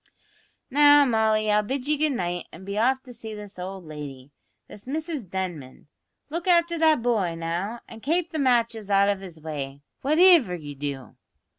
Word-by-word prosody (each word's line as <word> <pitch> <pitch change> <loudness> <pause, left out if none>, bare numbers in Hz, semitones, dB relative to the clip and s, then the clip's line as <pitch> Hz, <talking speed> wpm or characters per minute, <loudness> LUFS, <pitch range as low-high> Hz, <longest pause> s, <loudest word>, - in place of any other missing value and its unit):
"Now, 290 +1 +7
Molly, 220 -3 +2
I'll 210 0 +4
bid 260 +5 -4
ye 300 - +2
good 300 0 +1
night 175 -6 -3
an' 185 +4 -12
be 200 +1 -5
off 260 +5 +1
to 250 - -12
see 220 -2 -8
this 205 -2 -10
owld 185 0 -6
lady, 145 -3 -9 0.4
this 205 - -12
Mrs 300 - -4
Denman. 170 -8 -6 0.4
Look 335 +3 -4
afther 340 -1 +3
that 315 -6 +4
boy, 205 -9 +1
now, 175 +8 -3
an 225 - -11
kape 335 +7 -1
the 315 - -3
matches 235 -5 +1
out 200 0 +4
of 200 -1 -1
his 175 -4 -10
way, 145 -3 -6 0.2
whativer 310 - +5
ye 145 -2 -8
do." 140 -2 -6
215 Hz, 175 wpm, -25 LUFS, 175-280 Hz, 0.4 s, Now